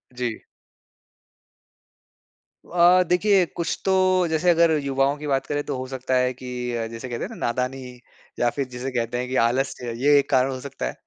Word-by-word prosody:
जी। 120 -2 -3 2.3
अ, 180 +1 +5
देखिए 190 +1 +3
कुछ 170 - -2
तो 190 - +2 0.4
जैसे 160 +2 +1
अगर 170 -1 +4
युवाओं 135 +1 +1
की 150 0 -7
बात 135 -1 0
करे 145 0 -1
तो 145 - -4
हो 130 - -4
सकता 130 0 -2
है 125 0 +1
कि 130 0 -11 0.3
अ, 115 -1 -2
जैसे 115 +3 -8
कहते 120 - -4
हैं - - -4
ना, - - -9
नादानी 125 +1 -3 0.4
या 120 - +3
फ़िर 135 +2 -3
जिसे 125 +2 -5
कहते 120 -1 -2
हैं 125 +1 -3
कि 130 - -4
आलस्य, 125 0 -1
ये 145 +4 +4
एक 140 0 -3
कारण 130 -1 +3
हो 130 - -5
सकता 140 0 -6
है - - -3
130 Hz, 190 wpm, -23 LUFS, 125-145 Hz, 2.3 s, अ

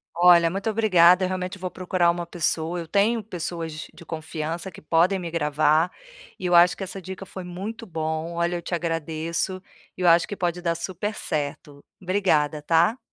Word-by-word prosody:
Olha, 170 -1 +6
muito 195 +5 -2
obrigada. 185 -4 +5
Eu - - +2
realmente 185 +1 -4
vou 185 -1 -5
procurar 180 -1 +1
uma 175 0 -4
pessoa, 170 0 -1
eu 165 - -6
tenho 210 +4 +2
pessoas 165 -4 -5
de 170 - -14
confiança 160 +2 -4
que - - -13
podem 170 +5 +2
me 175 -3 -5
gravar, 155 +1 +2 0.5
e 185 - -5
eu 180 - +1
acho 175 +1 +6
que 195 - -5
essa 190 +1 -6
dica 190 +1 -8
foi 185 0 -8
muito 200 +6 -6
bom. 160 -1 -3
Olha, 170 +1 0
eu 175 - -3
te 175 - -3
agradeço 165 +2 -2 0.4
e - - -6
eu 180 - +3
acho 170 0 +5
que 205 - -5
pode 175 -1 -1
dar 170 -1 0
super 190 +5 -4
certo. 145 -1 -4 0.2
Obrigada, 175 -6 +1
tá. 170 - +3
175 Hz, 185 wpm, -24 LUFS, 165-185 Hz, 0.5 s, Olha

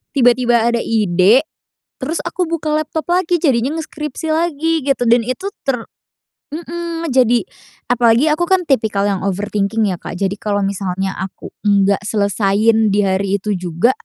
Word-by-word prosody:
tiba-tiba 245 -2 +3
ada 235 0 +1
ide, 210 - +3 0.6
terus 325 +2 -3
aku 350 +1 -1
buka 320 -2 -2
laptop 310 +1 -3
lagi 355 -1 +2
jadinya 270 -1 +1
ngeskripsi 310 -1 -6
lagi 325 0 0
gitu 275 -3 +1
dan 240 +1 +5
itu 255 +9 -4 0.2
ter 245 -4 -1 0.7
mmm, 335 0 -5
jadi 245 -2 +4 0.5
apalagi 240 +3 +4
aku 330 +3 +1
kan 380 -1 +4
tipikal 215 -6 +1
yang 200 -2 0
overthinking 205 +2 -1
ya, 180 - -3
Kak. - - -7
Jadi 195 0 0
kalau 205 -1 -1
misalnya 195 -1 -2
aku 190 0 -7
nggak 200 -1 +3
selesaiin 210 +1 +2
di 205 0 +2
hari 195 +1 0
itu 210 +2 -2
juga, 175 +6 +1
235 Hz, 150 wpm, -17 LUFS, 200-305 Hz, 0.7 s, dan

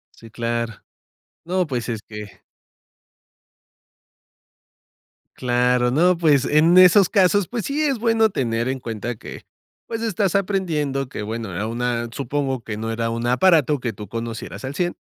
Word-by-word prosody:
Sí, 115 - -14
claro. 115 -1 -2 0.7
No, 180 +1 0
pues 125 -5 -3
es 115 -3 -3
que 105 -2 -10 2.9
Claro, 125 0 +1
no, 175 +6 +3
pues, 150 -5 +3
en 160 +5 +4
esos 185 +1 +7
casos, 195 -1 +3
pues, 235 -4 -4
sí 290 +2 -1
es 275 -6 0
bueno 225 -1 +3
tener 115 - -1
en 130 0 -2
cuenta 115 0 -5
que, - - -10 0.4
pues 225 -1 -4
estás 200 -4 0
aprendiendo 160 -9 0
que 125 - -7
bueno, 110 0 -4
a 100 +5 -3
una 120 +1 -2
supongo 135 -1 -2
que 105 -1 -6
no 110 +1 -4
era 115 0 -1
un 115 +1 -3
aparato 150 +2 +3
que 120 -2 -3
tú 105 -1 -10
conocieras 115 +3 -6
al 135 +2 -5
cien 175 +2 -1
130 Hz, 150 wpm, -22 LUFS, 115-180 Hz, 2.9 s, esos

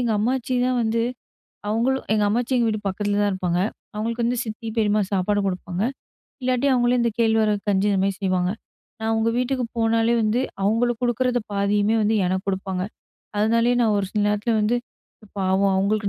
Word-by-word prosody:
எங்க 240 -2 +1
அம்மாச்சிதான் 250 +2 0
வந்து, 230 +1 +1 0.7
அவுங்களும் 245 +5 0
எங்க 210 -1 +2
அம்மாச்சி 240 +4 0
எங்க 235 - +2
வீட்டு 215 -1 -1
பக்கத்துல 205 +1 -1
தான் 205 - +2
இருப்பாங்க. 180 -2 -1 0.3
அவுங்களுக்கு 230 +3 -1
சித்தி, 225 0 -6
பெரியம்மா 210 -1 +2
சாப்பாடு 205 +2 +1
குடுப்பாங்க. 180 0 -3 0.6
இல்லாட்டி 255 +2 +1
அவங்களே 245 0 +3
இந்த 235 -1 +1
கேள்வரகு 220 -2 +2
கஞ்சி 200 +1 +2
இந்த 195 - +1
மாரி 195 - +1
செய்வாங்க. 185 -2 +1 0.5
நான் 220 0 -2
அவுங்க 225 +1 +1
வீட்டுக்கு 250 0 -1
போனாலே, 225 0 +2
வந்து 215 +2 +1 0.2
அவுங்களுக்கு 230 +3 +1
குடுக்கிறத 245 +1 +1
பாதியுமே 205 +2 +2
வந்து 215 +1 +2
எனக்கு 185 +2 -1
குடுப்பாங்க. 190 -1 -2 0.6
அதனாலயே 230 +3 +3
நான் 220 -2 +2
ஒரு 195 - -1
சில 210 - 0
நேரத்துல 210 +3 0
வந்து, 215 +3 +2 0.6
பாவம் 190 +1 +2
அவங்களுக்கு 200 +2 +1
220 Hz, 160 wpm, -23 LUFS, 200-235 Hz, 0.7 s, அவங்களே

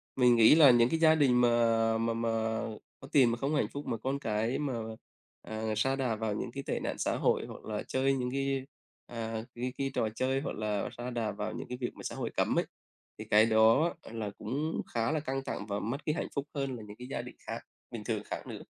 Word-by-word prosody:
Mình 125 -2 +5
nghĩ 115 +4 +8
là 150 -5 +9
những 120 0 +5
cái 165 - 0
gia 160 -1 +6
đình 130 -5 +4
mà 115 -2 +3
mà 115 0 0
mà 115 0 -1 0.7
có 135 - -11
tiền 130 -6 +5
mà 115 - -1
không 140 +5 -1
hạnh 145 - +2
phúc, 145 +1 -6
mà 115 - -1
con 135 +5 -2
cái 110 0 -1
mà, 145 -3 -1 0.7
à, 110 0 -3
sa 135 +5 +2
đà 130 -4 0
vào 110 -1 -2
những 115 +3 -4
cái 140 +3 -6
tệ - - -1
nạn - - -3
xã - - 0
hội, - - +2
hoặc - - -10
là 105 -1 -3
chơi 135 +1 +2
những 125 -2 -1
cái, 135 0 -1 0.4
à, 115 -2 -4
cái 125 +1 -3
cái 135 -1 -1
trò 110 - +1
chơi 130 +2 0
hoặc 145 - -4
là 105 -1 -1
sa 120 +1 -4
đà 115 -3 -1
vào 105 +1 -4
những - - -6
cái 125 - -5
việc 120 - 0
mà - - -10
xã - - -4
hội - - -3
cấm - - +2
ấy, - - 0 0.5
thì - - -7
cái 105 +1 +6
đó 115 +9 +5
là 110 -2 -5
cũng 145 +8 -2
khá 115 +3 +1
là 155 - +1
căng 135 -2 -3
thẳng 100 - -4
và 100 -1 -2
mất 135 +8 -4
cái 150 - +1
hạnh - - -2
phúc 140 +1 -2
hơn 135 -2 -2
là 115 - -8
những 105 - -9
cái 125 - -8
gia 130 - -3
đình 125 0 -10
khác - - -3 0.3
bình - - -6
thường - - -2
khác - - -6
nữa. - - -7
120 Hz, 250 wpm, -31 LUFS, 115-135 Hz, 0.7 s, là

